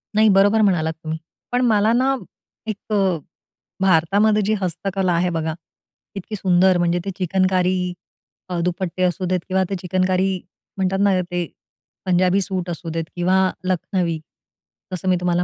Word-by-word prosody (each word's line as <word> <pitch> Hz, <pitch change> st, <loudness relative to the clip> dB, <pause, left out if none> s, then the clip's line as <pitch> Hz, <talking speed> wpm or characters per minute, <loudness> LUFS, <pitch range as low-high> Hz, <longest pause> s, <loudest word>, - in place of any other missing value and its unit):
नाही, 215 Hz, 0 st, +5 dB
बरोबर 205 Hz, +3 st, +5 dB
म्हणालात 170 Hz, -6 st, +2 dB
तुम्ही. 160 Hz, 0 st, -3 dB, 0.3 s
पण 245 Hz, 0 st, +1 dB
मला 215 Hz, -2 st, +3 dB
ना, 260 Hz, +3 st, +2 dB, 0.5 s
एक 215 Hz, 0 st, -5 dB
अ, 190 Hz, -4 st, +2 dB, 0.6 s
भारतामध्ये 195 Hz, +4 st, +3 dB
जी 215 Hz, -, +2 dB
हस्तकला 185 Hz, +1 st, -1 dB
आहे 175 Hz, +2 st, +1 dB
बघा, 160 Hz, 0 st, -1 dB, 0.6 s
इतकी 200 Hz, +2 st, -5 dB
सुंदर 185 Hz, -1 st, +3 dB
म्हणजे, 175 Hz, 0 st, +1 dB
ते 195 Hz, -, -2 dB
चिकनकारी 185 Hz, -1 st, +1 dB, 0.6 s
अ, 180 Hz, -1 st, -2 dB
दुपट्टे 180 Hz, +1 st, -2 dB
असू 180 Hz, 0 st, 0 dB
देत 180 Hz, 0 st, +1 dB
किंवा 190 Hz, 0 st, +2 dB
ते 195 Hz, -, -1 dB
चिकनकारी 185 Hz, +1 st, +1 dB, 0.4 s
म्हणतात 190 Hz, 0 st, 0 dB
ना, 200 Hz, -2 st, +3 dB
ते 175 Hz, 0 st, -3 dB, 0.6 s
पंजाबी 185 Hz, +1 st, +3 dB
सूट 185 Hz, -1 st, -3 dB
असू 170 Hz, 0 st, -5 dB
देत. 165 Hz, 0 st, -2 dB
किंवा 185 Hz, +1 st, +2 dB
लखनवी 180 Hz, -2 st, -1 dB, 0.7 s
जसं 185 Hz, 0 st, -2 dB
मी 185 Hz, -, +4 dB
तुम्हाला 175 Hz, 0 st, +1 dB
185 Hz, 150 wpm, -21 LUFS, 175-195 Hz, 0.7 s, नाही